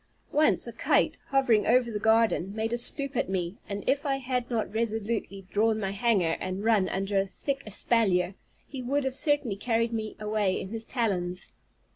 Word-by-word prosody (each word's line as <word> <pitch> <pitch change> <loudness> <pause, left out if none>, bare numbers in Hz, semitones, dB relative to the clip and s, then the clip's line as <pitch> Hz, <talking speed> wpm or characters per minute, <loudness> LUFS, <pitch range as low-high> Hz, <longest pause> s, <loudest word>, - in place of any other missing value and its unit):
Once 305 0 +3
a - - -5
kite, - - +1
hovering 260 -6 +2
over 240 0 +3
the 210 - -3
garden, 220 -3 +2
made 225 +1 -2
a - - +1
stoop 280 +3 +4
at 230 - 0
me, 180 0 -2
and 200 0 -5
if 280 +1 +2
I 275 -2 0
had 250 -2 -2
not 225 -3 -2
resolutely 220 -3 -2
drawn 220 +1 +2
my 195 -2 -2
hanger, 200 -6 +1
and 185 +2 -4
run 215 -4 +3
under 195 +1 0
a 195 - +1
thick 275 +7 -4
espalier, 195 -4 +1 0.3
he 270 -3 -7
would 275 +3 0
have 265 -1 -2
certainly 280 -7 +1
carried 230 +1 0
me 220 -1 -4
away 210 -3 0
in 190 - -6
his 225 +1 -5
talons. 185 -7 -2
220 Hz, 185 wpm, -27 LUFS, 195-245 Hz, 0.3 s, stoop